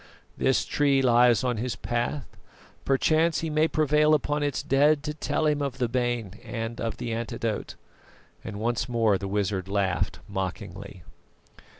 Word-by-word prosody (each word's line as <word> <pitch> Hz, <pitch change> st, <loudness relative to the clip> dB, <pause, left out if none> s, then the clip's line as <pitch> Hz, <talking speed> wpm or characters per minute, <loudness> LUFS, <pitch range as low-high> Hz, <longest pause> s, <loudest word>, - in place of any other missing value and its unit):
This 130 Hz, -, +1 dB
tree 140 Hz, -2 st, +2 dB
lies 120 Hz, -1 st, +5 dB
on 125 Hz, -2 st, 0 dB
his 120 Hz, +3 st, -2 dB
path; 120 Hz, +4 st, -2 dB, 0.6 s
perchance 155 Hz, +4 st, +2 dB
he 160 Hz, -1 st, -3 dB
may 155 Hz, +1 st, +3 dB
prevail 150 Hz, 0 st, +3 dB
upon 145 Hz, +1 st, -1 dB
its 145 Hz, -2 st, -1 dB
dead 145 Hz, +2 st, +3 dB
to 150 Hz, 0 st, -3 dB
tell 155 Hz, +1 st, -1 dB
him 150 Hz, -1 st, +2 dB
of 140 Hz, -2 st, -3 dB
the 125 Hz, -2 st, 0 dB
bane 120 Hz, -4 st, -2 dB
and 115 Hz, -1 st, -5 dB
of 115 Hz, -3 st, -3 dB
the 120 Hz, -2 st, -3 dB
antidote." 115 Hz, -1 st, -3 dB, 0.7 s
And 105 Hz, -2 st, -6 dB
once 115 Hz, +1 st, -1 dB
more 115 Hz, -5 st, +2 dB
the 95 Hz, -, -4 dB
wizard 95 Hz, -2 st, -1 dB
laughed 95 Hz, -2 st, 0 dB
mockingly. 95 Hz, -1 st, -6 dB
120 Hz, 155 wpm, -26 LUFS, 105-145 Hz, 0.7 s, lies